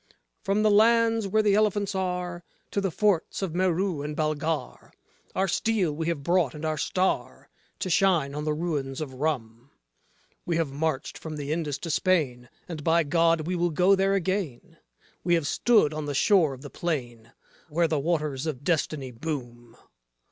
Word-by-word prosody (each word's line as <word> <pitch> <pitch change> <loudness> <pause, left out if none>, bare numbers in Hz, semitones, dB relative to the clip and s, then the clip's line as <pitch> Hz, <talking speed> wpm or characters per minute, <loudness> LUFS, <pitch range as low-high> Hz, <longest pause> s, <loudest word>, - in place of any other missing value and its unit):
From 205 +1 +1
the 215 - +4
lands, 225 0 +4
where 215 +3 +2
the 205 -1 +3
elephants 205 -1 +2
are, 180 -2 -3 0.3
to 200 - 0
the 195 - 0
forts 195 +1 0
of 180 -5 -2
Merou 180 -3 0
and 150 0 -5
Balghar, 155 0 -2 0.4
Our 190 +1 +1
steel 190 -4 0
we 160 +1 -3
have 165 -5 -2
brought 170 -4 +2
and 150 +1 -6
our 155 0 0
star 185 +6 -1 0.3
to - - -3
shine 170 -6 +2
on 150 +1 -4
the 155 0 0
ruins 145 -5 -2
of 150 -4 -5
Rum. 130 -4 -3 0.7
We 170 -2 -1
have 160 -4 -1
marched 150 -1 -2
from 160 -1 -6
the 145 -1 -4
Indus 155 -3 -1
to 165 +3 -5
Spain, 145 -9 +1 0.2
and 160 -4 -6
by 165 +2 +3
God 165 +1 +2
we 180 +2 -1
will 175 0 +1
go 180 +5 +4
there 195 0 +2
again; 185 -8 -3 0.4
We 175 -1 +3
have 165 -3 0
stood 185 -1 +3
on 155 -1 -4
the 145 - -3
shore 165 -4 +3
of 130 - -15
the 145 - -9
plain 120 -9 -4 0.4
where 165 +2 +2
the 155 -2 0
Waters 150 -2 -1
of 145 -3 -4
Destiny 150 -5 -1
boom. 120 -3 -6
165 Hz, 175 wpm, -26 LUFS, 145-185 Hz, 0.7 s, the